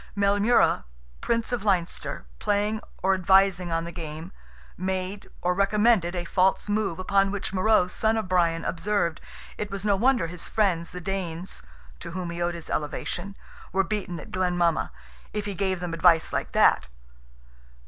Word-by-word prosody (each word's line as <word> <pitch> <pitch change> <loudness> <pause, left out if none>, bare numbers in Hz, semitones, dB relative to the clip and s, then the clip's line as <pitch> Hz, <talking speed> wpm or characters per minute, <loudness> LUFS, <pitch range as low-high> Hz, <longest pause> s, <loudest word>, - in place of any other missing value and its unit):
Maelmurra, 200 - +3 0.4
Prince 230 +1 0
of 240 -4 -1
Leinster, 180 - -1
playing 210 +2 0 0.2
or 195 +1 +4
advising 190 -1 +3
on 165 0 0
the 170 - -6
game, 160 0 -7 0.4
made, 185 +2 -3
or 180 +1 +2
recommended, 200 -1 +3
a 175 -1 -3
false 185 +4 +2
move, 205 -4 0
upon 195 +1 +2
which 200 0 -4
Morrogh, 190 -1 +3
son 220 0 +1
of 220 - -2
Brian, 170 -2 +1
observed, 170 -1 -1 0.4
it 210 - -3
was 200 0 -5
no 205 -1 +3
wonder 245 +1 +2
his 170 +1 -6
friends, 180 -6 +1
the 180 - -7
Danes, 180 -1 -4 0.4
(to 170 - -7
whom 180 -1 -4
he 170 +1 -5
owed 175 0 0
his 170 - -8
elevation,) 175 +6 -3 0.3
were 195 +1 +2
beaten 185 -3 -3
at - - -11
Glen 180 -1 0
Mama, 170 -2 +1 0.4
if 210 -1 -2
he 205 - -3
gave 190 -1 -1
them 175 -1 -4
advice 165 0 +4
like - - -2
that. - - +4
185 Hz, 165 wpm, -26 LUFS, 175-205 Hz, 0.4 s, or